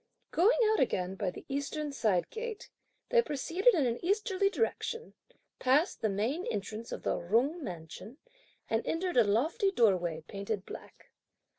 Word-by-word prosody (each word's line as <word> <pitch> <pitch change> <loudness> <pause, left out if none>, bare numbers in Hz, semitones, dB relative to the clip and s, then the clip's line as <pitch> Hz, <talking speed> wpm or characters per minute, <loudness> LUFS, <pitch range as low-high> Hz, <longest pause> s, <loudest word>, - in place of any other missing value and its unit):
Going 390 +9 +4
out 440 - +2
again 185 -7 0
by 195 -1 -2
the - - -10
eastern 285 +2 -3
side 215 -9 +1
gate, 455 -1 -6 0.4
they 480 -1 +5
proceeded 345 - +2
in 300 -6 +2
an 235 +4 -2
easterly 395 +1 +1
direction, 395 - -2 0.5
passed 285 +8 +2
the 220 - +1
main 225 - -1
entrance 215 +3 -4
of - - -5
the - - 0
Jung 255 - +1
mansion, 180 - -8 0.5
and 225 +1 0
entered 355 +2 -1
a 240 - +8
lofty 300 - +2
doorway 180 - +2
painted 200 0 -4
black. - - -11
260 Hz, 150 wpm, -31 LUFS, -, 0.5 s, a